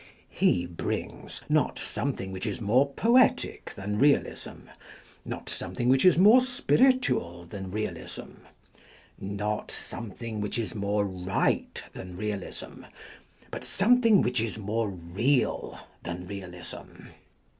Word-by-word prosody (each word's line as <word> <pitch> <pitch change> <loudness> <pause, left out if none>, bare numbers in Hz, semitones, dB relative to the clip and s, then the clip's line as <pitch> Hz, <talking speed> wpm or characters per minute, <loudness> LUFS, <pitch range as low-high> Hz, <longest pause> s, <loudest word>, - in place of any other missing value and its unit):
He 90 -1 +2
brings, 85 -1 -5
not - - +2
something 95 0 -3
which 95 -1 -4
is - - -3
more 125 +6 +3
poetic 235 - +3
than 105 +2 -3
Maeterlinck - - 0
realism, 145 0 +2 0.6
not - - -6
something 120 0 -2
which 130 +4 +4
is 180 -3 +7
more 215 +8 +8
spir 250 -1 +1
itual 245 - +2
than 95 0 -7
realism, 110 +3 -6 0.7
not 105 +2 -3
something 115 -1 -6
which 105 - -2
is 115 -1 -2
more 100 -1 0
right 95 -1 -1
than 90 -1 -8
realism, 105 -1 -5 0.7
but - - -5
something 230 0 +4
which 125 -2 +1
is 115 -1 -2
more 110 +1 -1
real 95 +10 0 0.2
than 85 +1 -5
realism. 90 -2 -8
105 Hz, 125 wpm, -28 LUFS, 95-135 Hz, 0.7 s, more